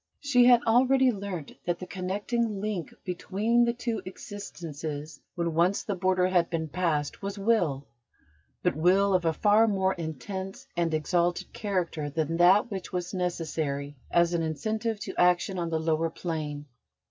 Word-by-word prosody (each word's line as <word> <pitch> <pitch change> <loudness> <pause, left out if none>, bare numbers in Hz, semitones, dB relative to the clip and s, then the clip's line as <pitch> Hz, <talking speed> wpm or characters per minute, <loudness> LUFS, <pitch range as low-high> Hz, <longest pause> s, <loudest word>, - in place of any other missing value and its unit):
She 250 -4 +4
had 245 -1 +6
already 255 +3 +4
learnt 195 -7 -5
that 175 -1 0
the 185 - -7
connecting 205 +4 -2
link 200 -4 -3
between 210 +6 +1
the 235 - +1
two 235 -2 -3
existences, 160 -7 -7
when 170 -1 -1
once 175 +5 +2
the 205 - -2
border 185 0 +2
had 175 -2 +2
been 160 -2 -2
passed, 155 -3 -1
was 200 +1 -4
Will: 180 -10 +1 0.8
but - - +2
Will 190 +5 +3
of 180 -2 +2
a 165 - +4
far 210 +6 +4
more 190 -2 +1
intense 185 +4 -6
and 170 -1 +1
exalted 170 +3 0
character 175 -7 -2
than 160 +2 -1
that 190 +6 +5
which 190 -2 -5
was 180 -1 -3
necessary 155 -5 -2
as 170 0 +3
an 170 - +1
incentive 215 +8 -2
to - - -5
action 180 +1 +3
on 170 -1 -2
the 160 -1 0
lower 160 0 +1
plane. 155 -4 -4
180 Hz, 160 wpm, -28 LUFS, 160-205 Hz, 0.8 s, had